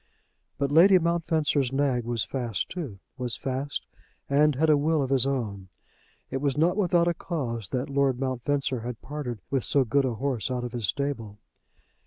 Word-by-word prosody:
But 140 0 -1
Lady 185 +5 +7
Mountfencer's 160 -5 +1
nag 135 -3 +1
was 120 -2 -1
fast 120 -7 -3
too, 150 - -5 0.2
was 125 -2 -2
fast 135 +1 -3 0.4
and 145 +1 +3
had 160 +5 +2
a 155 - +6
will 155 +2 +2
of 135 - -3
his 135 -1 +4
own. 105 -8 -3 0.6
It - - -1
was 140 0 -1
not 170 +4 +3
without 175 -4 +3
a 175 - +2
cause 120 - -4
that 125 +4 -2
Lord 140 -2 +1
Mountfencer 135 0 -1
had 120 0 -5
parted 130 -7 -5
with 135 -3 +1
so 140 - +3
good 135 +4 +2
a 125 -3 -1
horse 130 -3 -2
out 125 -1 -2
of 120 - -4
his 115 -4 -2
stable. 125 -7 -3
135 Hz, 180 wpm, -27 LUFS, 120-150 Hz, 0.6 s, Lady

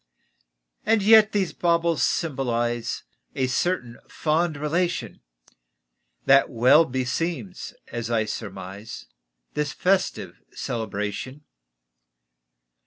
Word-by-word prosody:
And 220 -2 +2
yet 220 0 +7
these 195 -4 0
baubles 170 -2 +1
symbolize 120 -6 -1 0.3
A 130 - +1
certain 125 -3 -1
fond 160 0 0
relation 170 +4 -2 1.0
That 135 0 +5
well 125 +7 +5
beseems, 130 - -3
as 115 -1 -4
I 115 -2 +1
surmise, 100 0 -7 0.5
This 150 -2 -2
festive 185 0 0
celebration. 105 +4 -4
135 Hz, 85 wpm, -24 LUFS, 115-170 Hz, 1.0 s, yet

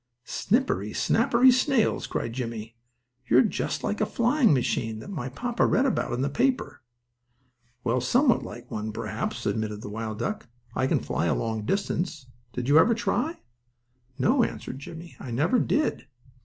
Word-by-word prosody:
"Snippery, 245 +7 0
snappery 250 +2 +4
snails!" 255 -2 +2
cried 115 - -3
Jimmie, 115 -2 -5 0.5
"you're 125 +3 +6
just - - -2
like 210 - -1
a - - +4
flying 245 +1 +3
machine 115 -4 0
that 195 - -9
my 135 -9 -4
papa 240 - -1
read 265 - +3
about 265 - 0
in 125 +2 -1
the - - +1
paper." 255 - 0 1.0
"Well, 125 +1 +1
somewhat 245 - +3
like 120 +1 -9
one, 110 0 -3
perhaps," - - -4
admitted 105 -1 -2
the - - -6
wild 110 0 -4
duck. 205 - -3 0.3
"I 130 - +1
can - - +1
fly - - -1
a - - +2
long 110 -2 -2
distance. 170 - -1 0.3
Did 125 0 -4
you 145 +3 +7
ever 230 +7 +5
try?" 315 +8 -1 0.8
"No," 245 - +3
answered 130 - -4
Jimmie; 170 +3 -10
"I 130 - -7
never 155 - +2
did." 300 - 0
145 Hz, 160 wpm, -26 LUFS, -, 1.0 s, you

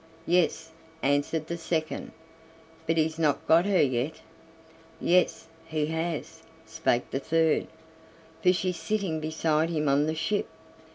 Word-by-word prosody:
"Yes," 170 -2 +1 0.3
answered 145 +3 +1
the 170 +1 -5
second, 160 -1 -2 0.8
"but 165 +1 +1
he's 160 0 +1
not 150 -3 +1
got 170 +4 +5
her 195 -5 +4
yet." 130 +2 0 0.9
"Yes, 180 -1 +2 0.2
he 155 -2 -1
has," 160 +1 -3 0.2
spake 120 +1 -1
the 135 - -1
third, 160 +2 +2 0.7
"for 180 - +5
she's 185 -1 -1
sitting 170 -1 -1
beside 155 0 0
him 155 -3 -1
on 140 +2 +3
the 155 - -1
ship." 180 +6 -1
160 Hz, 130 wpm, -27 LUFS, 155-170 Hz, 0.9 s, got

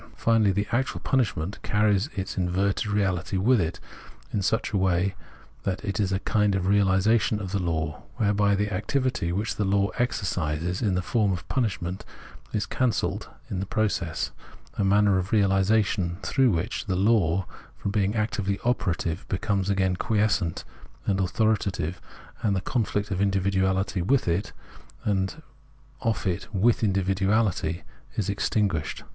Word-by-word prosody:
Finally, 115 -3 +3
the 100 +2 0
actual 130 +2 0
punishment 105 -7 0
carries 105 +3 +2
its 95 -1 -3
inverted 95 +3 0
reality 95 -3 0
with 115 +4 +4
it, 80 0 -2 0.5
in 100 - +1
such 95 +4 0
a - - +2
way 95 0 +2 0.5
that 95 +2 -3
it 100 0 -2
is 100 -3 +1
a 95 - +2
kind 105 -2 +2
of 95 - 0
realisa 100 +3 +3
tion 105 +1 0
of 95 -3 -5
the 100 - 0
law, 80 -2 -2
whereby 100 -3 +2
the 105 +1 -1
activity, 105 -2 0
which 105 +5 -2
the 105 - +1
law 100 +1 +2
exercises 90 -7 -1
in 100 -6 +1
the 90 - 0
form 105 0 +1
of 90 -2 -4
punishment, 95 -8 -1 0.5
is 105 0 -1
cancelled 125 -3 -1 0.2
in 95 - -3
the 95 - -2
process, 100 -7 -1 0.4
a 105 - -1
manner 100 0 +4
of 95 +2 -4
realisation 95 -3 +2
through 135 -3 +3
which 85 -5 -1
the 95 - 0
law, 95 -3 +2 0.3
from 100 - -3
being 100 0 +1
actively 100 -3 0
operative, 90 -7 -1
becomes 100 0 -1
again 95 -2 +2
quiescent 105 -4 0 0.4
and 95 -1 +1
authoritative, 95 -3 0 0.4
and 100 -3 +1
the 95 - 0
conflict 105 -2 -1
of 95 0 -1
indi 100 -1 +2
viduality 95 -1 +1
with 130 +5 +2
it, 85 +5 0 0.5
and 100 +9 -1 0.6
of 115 -5 -1
it 90 -3 -2
with 110 +4 +2
individuality, 95 -3 +1 0.3
is 100 -1 0
ex 100 - -1
tinguished. 95 -8 -1
100 Hz, 155 wpm, -26 LUFS, 95-105 Hz, 0.6 s, with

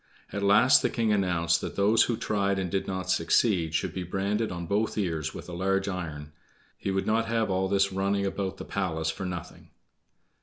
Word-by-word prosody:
At 100 - -2
last 105 +7 +6
the - - +1
king 115 -3 +1
announced 85 -4 +1
that - - -5
those 105 +3 +4
who 115 - -1
tried 100 -3 0
and 95 -3 -2
did 95 0 -1
not 95 -1 -2
succeed 80 -1 +2
should - - -1
be 95 - -4
branded 100 +5 -1
on 85 -1 -5
both 105 +6 -1
ears 80 -6 -2
with - - -8
a 90 - -8
large 95 +2 0
iron; 80 -6 -5 0.4
he - - -4
would 95 0 0
not 115 +1 +1
have 115 -2 0
all 95 +1 +1
this 100 0 +1
running 100 +1 0
about 95 0 -3
the - - -7
palace 80 -5 -2
for 95 +3 -6
nothing. 90 -2 -7
95 Hz, 200 wpm, -27 LUFS, 90-100 Hz, 0.4 s, last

